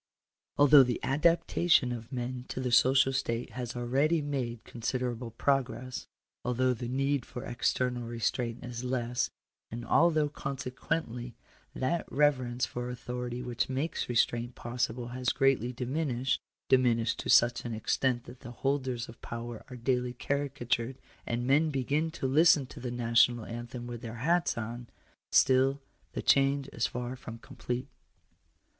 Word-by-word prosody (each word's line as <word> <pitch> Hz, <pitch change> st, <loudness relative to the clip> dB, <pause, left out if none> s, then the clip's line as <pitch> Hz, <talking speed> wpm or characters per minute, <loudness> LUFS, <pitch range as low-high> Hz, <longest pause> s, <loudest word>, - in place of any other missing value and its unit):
Although 145 Hz, 0 st, +8 dB
the 125 Hz, -2 st, +1 dB
adaptation 165 Hz, 0 st, +3 dB
of 115 Hz, 0 st, -6 dB
man 125 Hz, 0 st, -4 dB
to -, -, -5 dB
the 125 Hz, -1 st, -1 dB
social 130 Hz, +2 st, +5 dB
state 120 Hz, -3 st, -2 dB
has 120 Hz, 0 st, -5 dB
al 120 Hz, 0 st, -3 dB
ready 145 Hz, +7 st, +2 dB
made 130 Hz, -6 st, -3 dB
considerable 120 Hz, 0 st, -3 dB
progress 130 Hz, +1 st, -1 dB, 0.2 s
— -, -, -62 dB
although 125 Hz, +1 st, +1 dB
the 120 Hz, 0 st, -5 dB
need 135 Hz, +1 st, 0 dB
for 125 Hz, 0 st, -8 dB
ex 120 Hz, -2 st, 0 dB
ternal 125 Hz, -2 st, -2 dB
restraint 120 Hz, +1 st, -2 dB
is 120 Hz, 0 st, -5 dB
less 125 Hz, -1 st, -1 dB, 0.2 s
— -, -, -62 dB
and 120 Hz, +1 st, -6 dB
although 155 Hz, 0 st, +4 dB
consequently 125 Hz, -3 st, -4 dB, 0.4 s
that 165 Hz, +6 st, -1 dB
rever 145 Hz, -3 st, +3 dB
ence 120 Hz, +1 st, -1 dB
for 120 Hz, 0 st, -5 dB
authority 125 Hz, 0 st, -5 dB
which 120 Hz, 0 st, -2 dB
makes 135 Hz, +3 st, -2 dB
restraint 120 Hz, 0 st, +1 dB
possible, 120 Hz, 0 st, -3 dB
has 125 Hz, 0 st, -1 dB
greatly 135 Hz, -3 st, +2 dB
diminished 130 Hz, 0 st, -1 dB, 0.2 s
— -, -, -62 dB
diminished 120 Hz, -3 st, +3 dB
to -, -, -4 dB
such 120 Hz, 0 st, +5 dB
an 115 Hz, -2 st, -4 dB
extent 120 Hz, +2 st, 0 dB
that 125 Hz, +1 st, -12 dB
the -, -, -10 dB
holders 130 Hz, -1 st, -1 dB
of 115 Hz, -, -13 dB
power 115 Hz, -1 st, -6 dB
are 125 Hz, -, -8 dB
daily 125 Hz, 0 st, 0 dB
caricatured, 130 Hz, -2 st, -2 dB, 0.3 s
and 120 Hz, +1 st, -1 dB
men 150 Hz, +5 st, +4 dB
begin 145 Hz, +3 st, 0 dB
to 160 Hz, -4 st, -5 dB
listen 145 Hz, +1 st, +5 dB
to -, -, -11 dB
the 125 Hz, -, -4 dB
National 120 Hz, -1 st, +3 dB
Anthem 120 Hz, +1 st, -6 dB
with 120 Hz, -1 st, -6 dB
their 115 Hz, -2 st, -6 dB
hats 170 Hz, +7 st, +1 dB
on 120 Hz, +2 st, -5 dB, 0.2 s
— -, -, -41 dB
still 135 Hz, +1 st, +4 dB, 0.3 s
the -, -, -4 dB
change 135 Hz, 0 st, +3 dB
is 115 Hz, -, -1 dB
far 125 Hz, +1 st, -4 dB
from 115 Hz, -3 st, -9 dB
complete. 125 Hz, 0 st, -5 dB
125 Hz, 160 wpm, -30 LUFS, 120-135 Hz, 0.4 s, Although